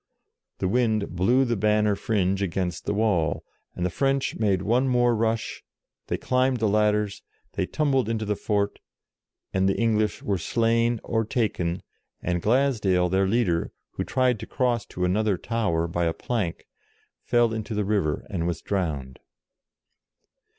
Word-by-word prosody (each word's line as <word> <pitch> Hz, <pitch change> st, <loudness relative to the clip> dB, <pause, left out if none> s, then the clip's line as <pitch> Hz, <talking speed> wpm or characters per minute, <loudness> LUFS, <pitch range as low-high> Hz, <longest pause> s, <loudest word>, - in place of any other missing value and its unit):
The -, -, -1 dB
wind 110 Hz, -1 st, +1 dB
blew 120 Hz, +9 st, +3 dB
the 120 Hz, -1 st, 0 dB
banner 105 Hz, 0 st, +2 dB
fringe 100 Hz, -3 st, 0 dB
against 90 Hz, -2 st, -2 dB
the -, -, 0 dB
wall, 100 Hz, -8 st, +1 dB, 0.3 s
and 90 Hz, -, -2 dB
the 90 Hz, -, -1 dB
French 135 Hz, +5 st, 0 dB
made 100 Hz, -4 st, +1 dB
one 120 Hz, +6 st, +2 dB
more 120 Hz, -2 st, +3 dB
rush, 115 Hz, 0 st, -1 dB, 0.4 s
they -, -, -1 dB
climbed 130 Hz, 0 st, +1 dB
the 110 Hz, -1 st, +1 dB
ladders, 105 Hz, 0 st, +1 dB, 0.3 s
they -, -, -1 dB
tumbled 135 Hz, -6 st, +1 dB
into 110 Hz, -1 st, -1 dB
the 105 Hz, 0 st, 0 dB
fort, 100 Hz, 0 st, -1 dB, 0.7 s
and 95 Hz, 0 st, +2 dB
the 95 Hz, -, 0 dB
English 110 Hz, -2 st, +1 dB
were 100 Hz, -3 st, 0 dB
slain 115 Hz, +4 st, +1 dB
or 115 Hz, -1 st, 0 dB
taken, 100 Hz, -6 st, -1 dB, 0.4 s
and 90 Hz, -1 st, -1 dB
Glasdale, 105 Hz, -7 st, +2 dB
their 95 Hz, +1 st, +2 dB
leader, 95 Hz, -6 st, +1 dB, 0.2 s
who -, -, -3 dB
tried 125 Hz, -3 st, +1 dB
to -, -, -7 dB
cross 120 Hz, -4 st, 0 dB
to 90 Hz, -, -2 dB
another 100 Hz, +1 st, +1 dB
tower 100 Hz, -7 st, -1 dB
by 85 Hz, 0 st, -1 dB
a 80 Hz, -, +1 dB
plank, 100 Hz, -1 st, -3 dB, 0.6 s
fell 120 Hz, -2 st, +2 dB
into 110 Hz, 0 st, -4 dB
the 105 Hz, -1 st, 0 dB
river 95 Hz, -8 st, 0 dB
and 85 Hz, -4 st, -2 dB
was 85 Hz, -, -2 dB
drowned. 75 Hz, -10 st, -2 dB
105 Hz, 155 wpm, -25 LUFS, 95-115 Hz, 0.7 s, blew